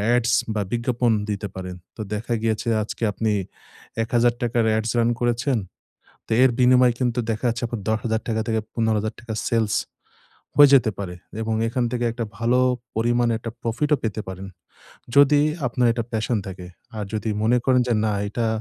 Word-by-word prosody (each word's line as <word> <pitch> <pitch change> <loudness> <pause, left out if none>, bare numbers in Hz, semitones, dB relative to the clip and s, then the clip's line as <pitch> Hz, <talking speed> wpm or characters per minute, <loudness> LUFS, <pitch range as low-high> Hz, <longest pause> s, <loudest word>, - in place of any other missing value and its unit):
ads 120 0 +1 0.2
বা 105 - +1
বিজ্ঞাপন 120 0 +1 0.2
দিতে 105 0 -2
পারেন। 90 -1 -6 0.2
তো - - -5
দেখা 110 +3 -2
গিয়েছে, 115 +1 -1
আজকে 110 - -6
আপনি 110 +1 -1 0.7
৳১,০০০ 120 0 +1
ads 110 +1 -1
রান 115 0 +3
করেছেন। 120 +2 +1 0.7
তে - - 0
এর 130 - +5
বিনিময়ে 125 -1 +5
কিন্তু 125 -1 0
দেখা 110 +3 -3
যাচ্ছে, 115 +2 -3
আপনার 115 -3 -5
৳১০,০০০ 110 0 -1
থেকে 110 -1 +1
৳১৫,০০০ 110 0 -1 0.2
সেলস 110 -3 +1 0.8
হয়ে 145 -1 +9
যেতে 120 -4 +5
পারে। 95 -3 -5 0.3
এবং 110 0 -1
এখান 125 +1 0
থেকে 120 -1 -1
একটা 115 -1 -3
ভালো 120 +2 +2 0.4
পরিমাণে 120 +1 +2
একটা 115 0 -6
প্রফিটও 145 +6 +1
পেতে 110 -1 -2
পারেন। 95 +1 -6 0.7
যদি 145 +1 +6 0.3
আপনার 120 0 +1
এটা 115 -1 -2
passion 110 +1 0
থাকে। 90 -1 -8 0.3
আর 105 - -2
যদি 110 +1 -2
মনে 120 +3 +4
করেন 130 -1 +4
যে 120 - +2
না, 105 - +1 0.2
এটা 115 +1 -1
115 Hz, 160 wpm, -23 LUFS, 110-120 Hz, 0.8 s, হয়ে